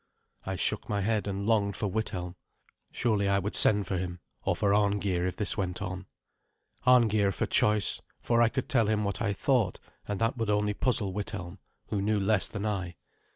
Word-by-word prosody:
I 95 Hz, -, -2 dB
shook -, -, -1 dB
my 100 Hz, -1 st, 0 dB
head, 105 Hz, +1 st, 0 dB
and 100 Hz, 0 st, -3 dB
longed 100 Hz, -3 st, +1 dB
for -, -, -3 dB
Withelm. 95 Hz, -3 st, -3 dB, 0.6 s
Surely 105 Hz, -4 st, 0 dB
I 100 Hz, -, +3 dB
would 100 Hz, +2 st, -2 dB
send 105 Hz, -2 st, +5 dB
for 95 Hz, 0 st, -2 dB
him, 90 Hz, -1 st, -5 dB, 0.2 s
or -, -, +1 dB
for 100 Hz, -1 st, +1 dB
Arngeir, 100 Hz, -3 st, +1 dB
if 90 Hz, -, -4 dB
this 105 Hz, -, 0 dB
went 90 Hz, -2 st, -2 dB
on. 95 Hz, -1 st, -5 dB, 0.8 s
Arngeir 110 Hz, -5 st, +4 dB
for -, -, -2 dB
choice, 105 Hz, -1 st, +2 dB, 0.2 s
for 120 Hz, 0 st, +1 dB
I 115 Hz, -, +5 dB
could 130 Hz, +3 st, -3 dB
tell 125 Hz, -8 st, +2 dB
him 105 Hz, 0 st, +1 dB
what 100 Hz, +2 st, -3 dB
I 105 Hz, -3 st, +1 dB
thought; 110 Hz, -2 st, 0 dB, 0.3 s
and 105 Hz, -1 st, -3 dB
that 115 Hz, +2 st, 0 dB
would 115 Hz, -2 st, -1 dB
only 105 Hz, 0 st, +1 dB
puzzle 105 Hz, -4 st, 0 dB
Withelm, 100 Hz, -2 st, -5 dB, 0.3 s
who 100 Hz, -, -1 dB
knew 105 Hz, +1 st, +1 dB
less 100 Hz, -1 st, +2 dB
than 105 Hz, 0 st, -5 dB
I. 95 Hz, -5 st, -3 dB
100 Hz, 195 wpm, -29 LUFS, 95-110 Hz, 0.8 s, send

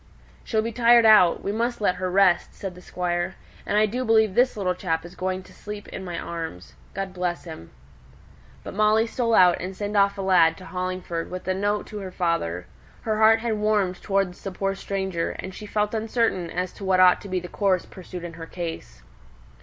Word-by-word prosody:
"She'll 220 Hz, -2 st, 0 dB
be 230 Hz, -, -3 dB
tired 235 Hz, 0 st, +5 dB
out; 210 Hz, -6 st, +6 dB
we 200 Hz, -, -1 dB
must 235 Hz, +3 st, -1 dB
let 185 Hz, -4 st, +1 dB
her 185 Hz, 0 st, -2 dB
rest," 185 Hz, -1 st, +3 dB
said 195 Hz, -2 st, -6 dB
the 180 Hz, -, -13 dB
Squire. 175 Hz, 0 st, -2 dB, 0.3 s
"And 205 Hz, -, +1 dB
I 215 Hz, -, +5 dB
do 245 Hz, +5 st, -2 dB
believe 220 Hz, -3 st, +3 dB
this 245 Hz, +2 st, +2 dB
little 185 Hz, -3 st, 0 dB
chap 165 Hz, -3 st, -2 dB
is 175 Hz, -, -10 dB
going 185 Hz, 0 st, -3 dB
to 185 Hz, -, -17 dB
sleep 210 Hz, -1 st, -8 dB
in 190 Hz, -, -7 dB
my 175 Hz, -2 st, -5 dB
arms. 160 Hz, -, -6 dB, 0.2 s
God 195 Hz, -1 st, -4 dB
bless 180 Hz, -1 st, -2 dB
him." 160 Hz, -, -10 dB, 0.9 s
But -, -, -7 dB
Molly 215 Hz, +2 st, +3 dB
stole 230 Hz, -1 st, 0 dB
out, 180 Hz, -1 st, +5 dB
and 185 Hz, +1 st, -6 dB
sent 205 Hz, 0 st, -3 dB
off 200 Hz, 0 st, +3 dB
a 195 Hz, -, -3 dB
lad 170 Hz, -4 st, +4 dB
to 185 Hz, -, -11 dB
Hollingford 180 Hz, -2 st, -4 dB
with 185 Hz, 0 st, -7 dB
a 185 Hz, -, +2 dB
note 205 Hz, +2 st, -1 dB
to 210 Hz, -, -7 dB
her 190 Hz, -2 st, -6 dB
father. 170 Hz, -, -1 dB, 0.4 s
Her 215 Hz, -1 st, -1 dB
heart 220 Hz, +1 st, +6 dB
had 225 Hz, -2 st, -1 dB
warmed 205 Hz, -4 st, +1 dB
towards 195 Hz, -2 st, -1 dB
the 195 Hz, -, -4 dB
poor 195 Hz, +1 st, -1 dB
stranger, 190 Hz, -3 st, -3 dB
and 190 Hz, -, -7 dB
she 210 Hz, +2 st, -9 dB
felt 210 Hz, +1 st, -1 dB
uncertain 220 Hz, -5 st, 0 dB
as 180 Hz, +1 st, -3 dB
to -, -, -11 dB
what 190 Hz, -1 st, +2 dB
ought 180 Hz, -1 st, +6 dB
to 200 Hz, -, -9 dB
be 185 Hz, 0 st, 0 dB
the 180 Hz, -, -8 dB
course 190 Hz, -2 st, 0 dB
pursued 180 Hz, -1 st, -9 dB
in 170 Hz, -1 st, -6 dB
her 165 Hz, -1 st, -9 dB
case. 165 Hz, -, -7 dB
190 Hz, 215 wpm, -24 LUFS, 180-210 Hz, 0.9 s, out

